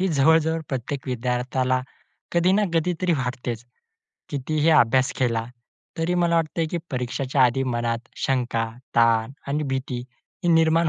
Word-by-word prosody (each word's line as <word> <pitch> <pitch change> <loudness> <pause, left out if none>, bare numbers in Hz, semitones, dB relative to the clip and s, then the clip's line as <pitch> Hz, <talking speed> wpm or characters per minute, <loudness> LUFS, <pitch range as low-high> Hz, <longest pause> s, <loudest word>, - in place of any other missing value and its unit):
ही 190 - +2
जवळ-जवळ 160 +1 +3
प्रत्येक 135 +1 -4
विद्यार्थ्याला 125 +1 0 0.5
कधी 175 +2 +3
ना 210 - +3
कधीतरी 175 +2 +1
वाटतेचं. 125 -4 -3 0.6
कितीही 150 +3 0
अभ्यास 130 -3 +4
केला, 115 -3 +1 0.5
तरी 165 +2 0
मला 170 -1 +2
वाटते 165 0 0
की 175 - -1
परीक्षाच्या 130 +1 0
आधी 125 +2 +3
मनात 115 0 -2 0.2
शंका, 125 -3 0 0.3
ताण 115 +1 +4 0.2
आणि 150 +2 0
भीती 130 -1 -2 0.5
ही 175 - +2
निर्माण 165 0 +4
135 Hz, 130 wpm, -24 LUFS, 125-160 Hz, 0.6 s, अभ्यास